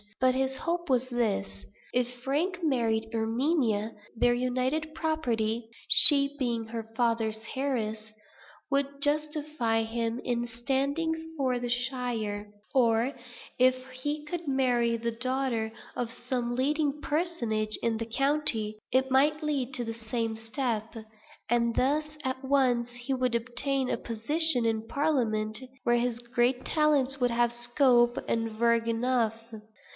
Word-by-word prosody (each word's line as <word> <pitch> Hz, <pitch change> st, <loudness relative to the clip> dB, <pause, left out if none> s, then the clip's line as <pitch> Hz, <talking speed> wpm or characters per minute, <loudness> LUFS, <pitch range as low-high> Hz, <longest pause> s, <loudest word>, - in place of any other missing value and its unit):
But 255 Hz, 0 st, +4 dB
his 265 Hz, 0 st, 0 dB
hope 340 Hz, +2 st, -3 dB
was 255 Hz, 0 st, +1 dB
this. 100 Hz, -, -2 dB, 0.3 s
If 245 Hz, 0 st, -1 dB
Frank 335 Hz, +8 st, -1 dB
married 225 Hz, -6 st, 0 dB
Erminia, 225 Hz, -1 st, 0 dB, 0.2 s
their 240 Hz, +1 st, +3 dB
united 255 Hz, +5 st, -1 dB
property 235 Hz, -9 st, -1 dB, 0.2 s
(she 280 Hz, -2 st, +8 dB
being 235 Hz, -3 st, -1 dB
her 225 Hz, 0 st, -6 dB
father's 225 Hz, -2 st, 0 dB, 0.2 s
heiress) 220 Hz, -5 st, -2 dB, 0.6 s
would 280 Hz, 0 st, -1 dB
justify 295 Hz, -6 st, +1 dB
him 230 Hz, +1 st, -2 dB
in 240 Hz, -1 st, -1 dB
standing 285 Hz, +7 st, -2 dB
for 255 Hz, -3 st, 0 dB
the 245 Hz, 0 st, -4 dB
shire; 240 Hz, -5 st, -2 dB, 0.2 s
or 240 Hz, 0 st, +3 dB, 0.5 s
if 255 Hz, 0 st, +5 dB, 0.2 s
he 290 Hz, +4 st, -4 dB
could 345 Hz, +1 st, -5 dB
marry 245 Hz, -4 st, +1 dB
the 235 Hz, +1 st, -2 dB
daughter 250 Hz, -2 st, -1 dB, 0.2 s
of 240 Hz, -2 st, -3 dB
some 245 Hz, -1 st, -3 dB
leading 295 Hz, +2 st, 0 dB
personage 240 Hz, -11 st, 0 dB
in 230 Hz, -1 st, +1 dB
the 230 Hz, -, -3 dB
county, 230 Hz, -5 st, +2 dB
it 265 Hz, +1 st, +2 dB
might 300 Hz, +4 st, +3 dB
lead 280 Hz, -4 st, -1 dB
to 245 Hz, -, -1 dB
the 225 Hz, -, -4 dB
same 225 Hz, 0 st, -3 dB
step; 225 Hz, -1 st, -3 dB, 0.5 s
and 235 Hz, 0 st, +1 dB
thus 300 Hz, +3 st, 0 dB
at 260 Hz, +1 st, -3 dB
once 255 Hz, -3 st, +2 dB
he 245 Hz, +3 st, -4 dB
would 255 Hz, -2 st, 0 dB
obtain 255 Hz, +3 st, 0 dB
a -, -, 0 dB
position 245 Hz, +3 st, +3 dB
in 225 Hz, 0 st, -1 dB
parliament, 225 Hz, -8 st, 0 dB, 0.2 s
where 240 Hz, 0 st, +3 dB
his 240 Hz, -1 st, -1 dB
great 245 Hz, +1 st, 0 dB
talents 285 Hz, -4 st, +2 dB
would 245 Hz, -1 st, +2 dB
have 240 Hz, 0 st, +2 dB
scope 240 Hz, 0 st, +3 dB
and 225 Hz, -1 st, -1 dB
verge 230 Hz, +1 st, +1 dB
enough. 230 Hz, -1 st, +1 dB
245 Hz, 135 wpm, -28 LUFS, 230-275 Hz, 0.6 s, she